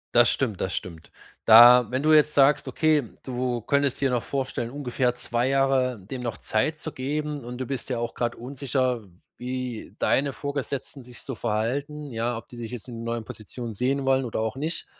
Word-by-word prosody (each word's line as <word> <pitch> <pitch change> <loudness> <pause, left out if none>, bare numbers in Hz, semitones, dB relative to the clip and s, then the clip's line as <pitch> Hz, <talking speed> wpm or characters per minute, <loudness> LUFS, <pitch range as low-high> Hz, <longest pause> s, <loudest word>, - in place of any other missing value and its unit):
Das 120 0 +7
stimmt, 115 -8 -1
das 95 - -1
stimmt. 85 -3 -7 0.3
Da 120 +2 +9
wenn 130 +2 -1
du 155 0 +5
jetzt 150 0 +5
sagst, 140 0 +4
okay, 155 +3 +2 0.2
du 125 -2 -2
könntest 140 +2 +1
dir 135 -2 +1
noch 120 -2 +1
vorstellen, 130 -3 -3
ungefähr 125 -2 -1
2 125 +1 -1
Jahre 135 -3 +2
dem 125 +7 -7
noch 120 -2 -4
Zeit 150 +9 0
zu 160 0 -6
geben, 145 +1 -3
und 120 +1 -7
du 130 - -3
bist 135 +1 -4
ja 125 - -1
auch 120 0 -3
grad 120 -1 -2
unsicher, 130 -1 -2 0.3
wie 125 -2 -5
deine 140 +1 +2
Vorgesetzten 140 -1 -5
sich 120 -1 -11
so 135 - -5
verhalten, 135 +7 -2
ja, 115 +1 -1
ob 115 - -9
die 120 - -13
dich 115 -1 -6
jetzt 125 0 -7
in 115 -2 -7
neuen 115 -1 -3
Positionen 115 +2 -7
sehen 135 +5 0
wollen 135 0 +3
oder 115 - -3
auch 110 +2 -2
nicht. 155 +5 -3
125 Hz, 195 wpm, -25 LUFS, 120-140 Hz, 0.3 s, Da